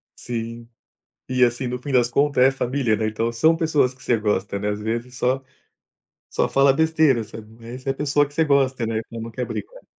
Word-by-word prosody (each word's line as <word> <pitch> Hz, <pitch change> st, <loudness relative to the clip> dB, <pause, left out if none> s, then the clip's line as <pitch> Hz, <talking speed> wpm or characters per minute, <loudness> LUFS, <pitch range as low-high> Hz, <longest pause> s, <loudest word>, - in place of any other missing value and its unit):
Sim. 115 Hz, 0 st, -6 dB, 0.6 s
E 130 Hz, -1 st, +2 dB
assim, 120 Hz, +1 st, +1 dB
no 125 Hz, 0 st, -4 dB
fim 140 Hz, -, -5 dB
das 120 Hz, -2 st, +3 dB
contas 140 Hz, 0 st, +2 dB
é 135 Hz, -, +6 dB
família, 130 Hz, -3 st, 0 dB
né, 110 Hz, 0 st, -1 dB
então 115 Hz, +2 st, -1 dB
são 160 Hz, +8 st, +3 dB
pessoas 150 Hz, -6 st, +2 dB
que 130 Hz, -, -22 dB
você 120 Hz, -, +2 dB
gosta, 105 Hz, -1 st, -1 dB
né, 105 Hz, +1 st, -1 dB
às 105 Hz, 0 st, -3 dB
vezes 120 Hz, +3 st, -4 dB
só 130 Hz, +2 st, 0 dB, 0.9 s
só -, -, 0 dB
fala 135 Hz, 0 st, +4 dB
besteira, 160 Hz, -6 st, +3 dB
sabe. 105 Hz, 0 st, -11 dB
Mas 115 Hz, -, -12 dB
essa 135 Hz, -, -4 dB
é -, -, +4 dB
a -, -, -3 dB
pessoa 145 Hz, 0 st, +1 dB
que 145 Hz, -, -19 dB
você 160 Hz, -, +2 dB
gosta, 135 Hz, -4 st, +2 dB
né, 110 Hz, -1 st, -1 dB
então 115 Hz, -1 st, -8 dB
não 115 Hz, 0 st, -6 dB
quer 125 Hz, +2 st, -3 dB
brigar. -, -, -7 dB
125 Hz, 220 wpm, -22 LUFS, 115-140 Hz, 0.9 s, é